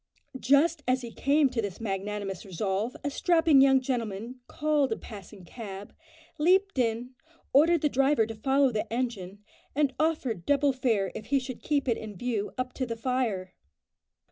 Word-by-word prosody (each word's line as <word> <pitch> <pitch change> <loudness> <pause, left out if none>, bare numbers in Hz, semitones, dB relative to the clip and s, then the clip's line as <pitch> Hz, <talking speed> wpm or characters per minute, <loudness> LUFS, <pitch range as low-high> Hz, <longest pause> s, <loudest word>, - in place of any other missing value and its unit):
Just 290 +6 +3
as 255 0 +1
he 235 - -7
came 285 +4 +3
to 240 -3 -1
this 200 -4 -5
magnanimous 200 -2 -4
resolve, 195 +5 -2
a 285 - -2
strapping 325 -3 +4
young 270 -1 +6
gentleman 240 -2 -4
called 295 -4 0
a 225 - -1
passing 200 -2 -11
cab, 200 -1 -9 0.5
leaped 375 +1 +3
in, 235 +1 0 0.4
ordered 320 +4 +5
the 300 - +3
driver 270 -3 +2
to 225 - -6
follow 270 +4 +2
the 215 0 -3
engine, 210 -5 -3 0.3
and 285 -2 +2
offered 290 - 0
double 285 -1 +3
fare 225 -8 0
if 215 - -8
he 280 - +2
should 255 -2 -5
keep 285 -3 0
it 235 - +1
in 215 -2 -8
view 215 0 -2
up 255 0 -3
to 255 - -3
the 230 -1 -4
fire. 225 -7 -2
250 Hz, 170 wpm, -28 LUFS, 210-280 Hz, 0.5 s, young